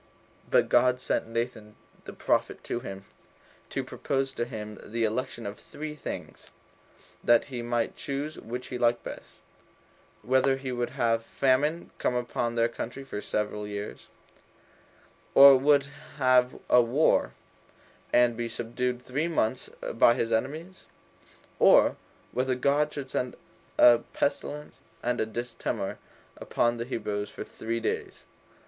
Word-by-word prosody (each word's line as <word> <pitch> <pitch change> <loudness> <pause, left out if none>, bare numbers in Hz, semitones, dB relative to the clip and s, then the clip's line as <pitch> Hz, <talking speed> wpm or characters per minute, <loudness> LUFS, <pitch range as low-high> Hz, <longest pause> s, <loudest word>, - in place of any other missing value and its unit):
But - - +4
God 125 +1 +4
sent 125 - -1
Nathan 115 -2 -4 0.3
the - - -8
prophet - - 0
to - - -3
him, 95 -5 -8 0.6
to - - -2
propose 135 -1 -2
to 120 - -2
him 105 -3 -7
the 115 +2 -2
election 115 +1 -2
of 100 +1 -6
three 155 0 -7
things, 150 - -7 0.7
that 120 -1 +5
he 120 - -3
might 120 -1 -1
choose 145 +2 -4
which 125 +2 -6
he 125 - -4
liked 120 0 +2
best: - - -10 0.8
Whether 130 +3 +3
he 135 -1 -5
would 120 -1 -1
have 115 -1 +2
famine 140 +7 +1
come 125 - 0
upon 120 -1 -1
the 115 0 +3
country 120 +3 -6
for 125 -6 -6
seven 105 0 -2
years, 105 0 -6 1.3
or 140 0 +11
would 140 +1 +4 0.3
have 130 -2 +3
a 125 - +6
war, 125 +7 +2 0.8
and 120 -1 +4
be 120 0 -3
subdued 125 +2 -3
three 140 +6 -1
months 130 -7 0 0.2
by 115 +1 +5
his 115 -2 -1
enemies? 155 +11 -2 0.7
or, - - +6 0.4
whether 130 0 0
God 145 +4 +2
should 140 -3 -6
send 125 -1 -2 0.4
a 120 -1 +8
pestilence 150 +1 -2 0.2
and 120 0 0
a 110 - 0
distemper 120 +2 -4 0.4
upon 120 0 0
the 115 - -3
Hebrews 105 -4 -3
for - - -7
three 115 +1 -4
days? 115 - -3
120 Hz, 140 wpm, -28 LUFS, 115-135 Hz, 1.3 s, or